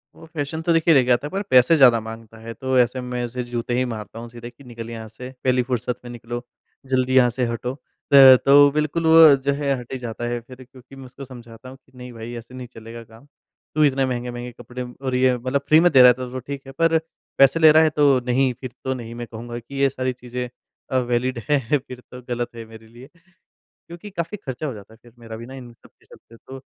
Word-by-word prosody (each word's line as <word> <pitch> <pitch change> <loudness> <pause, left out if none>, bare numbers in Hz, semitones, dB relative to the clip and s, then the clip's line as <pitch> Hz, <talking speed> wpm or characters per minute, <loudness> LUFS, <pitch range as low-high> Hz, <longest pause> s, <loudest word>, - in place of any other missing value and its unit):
वो 165 - -14
फैशन 160 +1 -4
तो 165 +1 +1
देखिए 165 0 +3
ले 130 -3 +5
के 125 - +1
आता 125 +4 +1
है - - -8
पर 195 - -2
पैसे 125 +5 +5
ज़्यादा 125 -5 +6
माँगता 115 0 -10
है, 115 0 -8
तो 130 +1 -2
ऐसे 125 +1 +1
में 125 0 -4
उसे 125 +1 -5
जूते 120 0 -4
ही 130 - +1
मारता 110 -2 -7
हूँ 120 0 -9
सीधे 120 0 -10
कि 140 - -19
निकल 115 -2 -9
यहाँ 110 -1 -8
से 125 +3 -10
पहली 130 -1 +2
फुर्सत 125 -1 -3
में 120 - -8
निकलो, 120 0 -7 0.4
जल्दी 130 0 0
यहाँ 125 -2 +5
से 125 +1 -2
हटो। 120 +2 -4 0.4
त 135 -2 +10
तो 145 +1 +7
बिल्कुल 150 +3 -1
वो 160 -2 +8
जो 140 - +1
है 140 -1 -1
हट 120 - -12
ही - - -3
जाता 120 -1 -6
है 120 0 -2
फिर 125 +2 -14
क्योंकि 130 +1 -17
मैं 135 - -11
उसको 130 +2 -11
समझाता 120 -1 -13
हूँ 130 - -12
कि, 135 - -32
नहीं 125 0 -10
भाई 115 +1 -8
ऐसे 115 +2 -12
नहीं 125 -1 -8
चलेगा 115 +1 -10
काम। 115 +3 -18 0.5
तू 155 - +3
इतने 135 -2 +2
महँगे-महँगे 120 -1 -5
कपड़े 125 +1 -7 0.2
और 130 -1 -1
ये 130 0 +3
मतलब 130 +3 -2
फ्री 155 +1 +6
में 175 +1 +4
दे 130 -3 +7
रहा 125 - +9
है 125 - +7
तो 125 0 -7
तो 130 - -5
ठीक 140 +2 -7
है, 135 - -10
पर 165 +4 +2 0.4
पैसे 135 +4 +5
ले 155 -1 +7
रहा 160 +1 +6
है 160 - +3
तो 145 -3 +3
नहीं, 130 +1 +1
फिर 130 -2 -6
तो 130 - -1
नहीं 115 -2 -8
मैं 120 0 -7
कहूँगा 120 +1 -8
कि 120 +4 -13
ये 135 0 +2
सारी 130 -1 -3
चीज़ें 125 0 -6 0.4
अ, 130 - +1
वैलिड 125 +1 -1
हैं 145 -1 +2
फिर 125 -1 -9
तो 125 - -10
गलत 120 0 -2
है 115 -1 -8
मेरे 110 0 -15
लिए। 120 +4 -14 0.6
क्योंकि 175 +5 -13
काफ़ी 170 +1 -4
खर्चा 130 +4 -4
हो 135 - -4
जाता 105 +1 -13
है - - -21
फिर 120 - -19
मेरा 115 -1 -9
भी 115 +1 -9
ना 130 - -11
इन 125 -3 -11
सब - - -21
के - - -32
चलते 115 - -18
तो। 130 +3 -12
125 Hz, 255 wpm, -22 LUFS, 120-135 Hz, 0.6 s, त